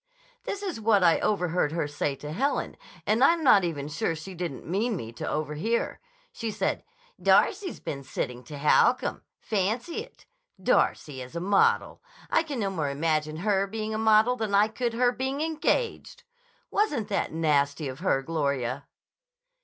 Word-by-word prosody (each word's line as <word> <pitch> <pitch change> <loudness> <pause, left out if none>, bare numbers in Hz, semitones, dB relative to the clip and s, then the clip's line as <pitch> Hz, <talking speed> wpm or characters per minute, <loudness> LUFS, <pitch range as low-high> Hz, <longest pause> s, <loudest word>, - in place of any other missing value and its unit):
"This 400 0 -4
is 355 - -4
what 210 -3 +4
I 170 -2 +5
overheard 180 -6 0
her 165 -3 -1
say 145 -1 -2
to 150 +2 -8
Helen, 275 - -1 0.3
and 220 +4 +3
I'm 335 +3 +4
not 210 -8 +6
even 150 -5 -3
sure 165 +2 -1
she 160 +5 -8
didn't 170 -6 -5
mean 210 +7 0
me 115 -10 -6
to 115 - -5
overhear. 155 +10 -1 0.3
She 230 - -4
said, 215 - -1 0.4
'Darcy's 395 -2 +3
been 140 - -5
sitting 125 -2 -4
to 150 - -8
Holcomb. 150 +2 +3 0.2
Fancy 220 - -1
it! - - -8 0.3
Darcy 135 -4 +1
as 125 +5 -10
a - - -1
model! 195 +3 +2 0.3
I - - +4
can 300 -5 -5
no 200 -3 -1
more 155 -6 -1
imagine 155 +1 -1
her 200 -2 +2
being 215 +1 -4
a 215 - -2
model 220 +2 +4
than 220 -4 -1
I 210 +2 +5
could 235 +1 -2
her 245 +1 +3
being 265 +3 -3
engaged.' 325 +9 -1 0.5
Wasn't 290 - 0
that 200 - -1
nasty 150 -2 +1
of 130 +1 -7
her, 150 -7 +1
Gloria!" 140 -4 -2
195 Hz, 165 wpm, -27 LUFS, 150-230 Hz, 0.5 s, not